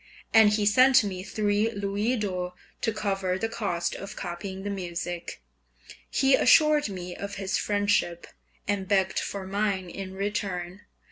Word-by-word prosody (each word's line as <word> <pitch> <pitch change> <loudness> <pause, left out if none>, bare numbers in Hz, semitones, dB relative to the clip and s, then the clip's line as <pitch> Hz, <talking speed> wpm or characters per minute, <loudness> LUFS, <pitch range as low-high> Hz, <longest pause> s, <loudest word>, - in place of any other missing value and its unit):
And 220 -2 +8
he 210 0 +1
sent 255 +4 +6
me 190 -3 -4
three 210 +2 0
louis 205 +3 -1
d'or 180 -4 -3 0.3
to 225 - +1
cover 195 -3 -1
the 225 - -1
cost 175 -7 -2
of 195 - -7
copying 190 +2 -6
the 205 - -3
music. 175 -2 -5 0.7
He 270 0 +3
assured 305 -1 +5
me 180 -2 -6
of 200 0 -6
his 195 0 -1
friendship, 205 -4 0 0.4
and 200 -2 -1
begged 190 -1 +2
for 195 -1 -4
mine 195 -2 -1
in 190 0 -7
return. 195 -2 -3
200 Hz, 145 wpm, -27 LUFS, 185-210 Hz, 0.7 s, And